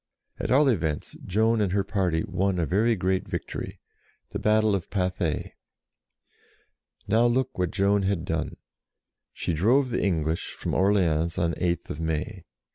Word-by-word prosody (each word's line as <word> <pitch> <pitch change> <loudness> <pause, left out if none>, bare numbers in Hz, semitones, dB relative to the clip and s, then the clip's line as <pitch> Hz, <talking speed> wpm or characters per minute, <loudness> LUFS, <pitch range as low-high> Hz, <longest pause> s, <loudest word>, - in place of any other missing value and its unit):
At - - -3
all 140 +3 +5
events, 80 - -1
Joan 110 +3 +2
and 95 -3 0
her 100 -1 +2
party 95 -5 0
won 95 0 0
a 85 - +1
very 110 +7 +2
great 95 0 0
victory, - - -5 0.5
the - - -3
battle 110 0 +3
of 95 -4 -2
Pathay. 90 -4 -1 1.5
Now 115 +4 +4
look 130 +2 0
what 90 -2 +1
Joan 100 +2 +2
had 95 -3 -1
done. 80 -3 -2 0.7
She - - -3
drove 125 - +3
the 120 - 0
English 80 -4 -1
from - - -4
Orleans 85 -4 +2
on 85 -1 +1
8th 85 -3 -2
May. 80 +4 -3
95 Hz, 145 wpm, -26 LUFS, 85-105 Hz, 1.5 s, all